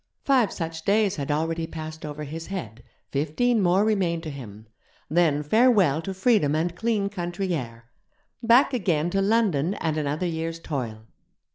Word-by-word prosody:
Five 260 -6 +3
such 160 -2 -5
days 205 0 +2
had 140 -1 -4
already 160 +2 -1
passed 155 -1 -7
over 150 0 -6
his 160 +3 -7
head, 125 - -6 0.3
fifteen 185 - +1
more 190 +3 +3
remained 180 -6 0
to 155 - -5
him. 110 -6 -10 0.5
Then 155 -3 +2
farewell 195 - +4
to 195 - -5
freedom 190 - +2
and 170 +2 -1
clean 215 -1 0
country 180 -1 -3
air! 115 -6 -5 0.5
Back 240 +4 +5
again 175 -8 0
to 195 - +1
London 195 -5 +2
and 160 -5 -2
another 150 +3 -1
year's 165 -1 -3
toil. 120 -9 -5
165 Hz, 155 wpm, -25 LUFS, 150-200 Hz, 0.5 s, Back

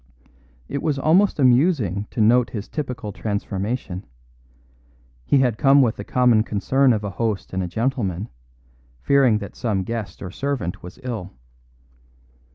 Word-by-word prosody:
It 140 - -3
was 150 -3 0
almost 175 +8 +3
amusing 125 - +2
to 115 - -2
note 120 +3 +4
his 105 -3 -6
typical 125 -8 -5
transformation; 100 -1 -3 1.2
he - - +4
had 125 -5 +1
come 140 0 +6
with 115 -3 +1
the 100 - -5
common 120 -1 +3
concern 125 +6 +2
of 110 -3 0
a 100 - -3
host 110 0 -3
and 95 - -1
a 90 - -2
gentleman, 110 -3 -2 0.8
fearing 135 -6 +4
that 100 -1 -8
some 105 -5 -1
guest 105 -3 -5
or 90 - -6
servant 130 -7 -3
was 90 - -11
ill. 110 -7 -4
115 Hz, 145 wpm, -22 LUFS, 100-130 Hz, 1.2 s, come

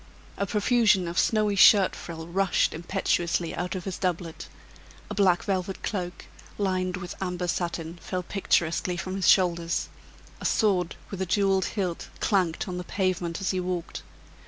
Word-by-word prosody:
A 200 - -2
profusion 210 -3 +3
of 170 +1 -1
snowy 215 -2 +2
shirt 200 -1 +7
frill 165 -1 -7
rushed 190 +3 +1
impetuously 170 -1 -1
out 180 +2 -3
of 185 - -4
his 190 -1 -5
doublet; 175 -3 -3 0.6
a - - -1
black 185 -4 +3
velvet 190 -1 -2
cloak, 180 -4 -4 0.3
lined 185 -2 0
with 175 -1 -6
amber 180 -1 -2
satin, 170 -1 -3
fell 185 -1 -3
picturesquely 175 -2 0
from 185 +1 -4
his 195 -2 0
shoulders; 170 -2 +2 0.5
a - - -8
sword 185 -6 +2 0.2
with 195 -2 -5
a 190 - -1
jeweled 195 0 +2
hilt 180 -4 -2
clanked 185 -3 +1
on 180 -1 -4
the - - -4
pavement 180 -2 -1
as 190 - 0
he 185 - -1
walked. 180 -2 -3
185 Hz, 160 wpm, -27 LUFS, 175-195 Hz, 0.6 s, shirt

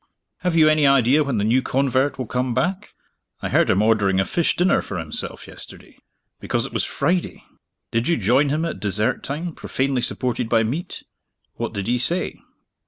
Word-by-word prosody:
Have 180 -2 -1
you 160 -2 +6
any 155 -2 +4
idea 135 +2 +4
when 140 -5 -2
the 100 - 0
new 120 +5 +3
convert 135 +1 0
will 130 - -3
come 125 +1 -2
back? 185 +10 -2 0.5
I - - -1
heard - - +3
him 95 +2 +3
ordering 105 -4 +2
a 95 - +2
fish 170 - 0
dinner 180 +2 +3
for 95 - -6
himself, 80 -2 -5
yesterday - - -11 0.4
because - - -1
it - - -9
was - - 0
Friday. 180 0 -1 0.5
Did 115 +2 0
you 170 - +2
join 125 +7 +3
him 155 +4 0
at 165 - -4
dessert 105 +1 0
time, 160 +5 -4
profanely 135 -3 -1
supported 120 -2 -1
by 115 -1 +3
meat? 140 +11 -4 0.5
What - - -4
did 100 -1 -3
he 120 +3 +1
say?" 170 +9 -1
130 Hz, 185 wpm, -22 LUFS, 115-155 Hz, 0.5 s, you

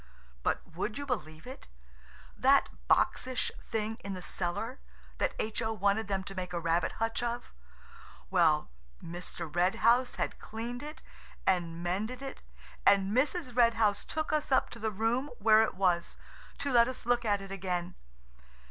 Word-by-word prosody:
But - - 0
would 210 +4 -2
you 285 - -4
believe 160 - -4
it?–that 60 - -1 0.2
boxish 255 0 +2 0.2
thing 220 0 -1
in 200 -4 -5
the 185 - -7
cellar, 210 +8 -3 0.4
that - - 0
H.O. 220 +1 -1
wanted 205 +1 +1
them 195 -2 -1
to 195 - -7
make 185 -1 -5
a 170 - 0
rabbit 170 +1 +1
hutch 225 +1 -1
of–well, 185 - -2 0.3
Mr. 170 -2 -7
Red 180 +2 +3
House 245 +2 +4
had - - -2
cleaned 235 +3 -5
it 300 +1 -8 0.4
and 170 -2 +1
mended 215 +9 -2
it, 270 - -7 0.4
and 200 +1 +4
Mrs. 285 0 +1
Red 235 -2 +5
House 210 -2 +2
took 310 0 -2
us 305 -2 0
up 260 - +3
to 235 - -8
the 220 0 0
room 225 +7 0
where 215 +1 +6
it 220 - 0
was, 180 -3 +1 0.4
to 280 0 -1
let 235 -1 +6
us 255 -3 -6
look 240 0 +2
at 205 -3 +2
it 195 0 -9
again. 180 -2 -2
215 Hz, 155 wpm, -31 LUFS, 180-240 Hz, 0.4 s, where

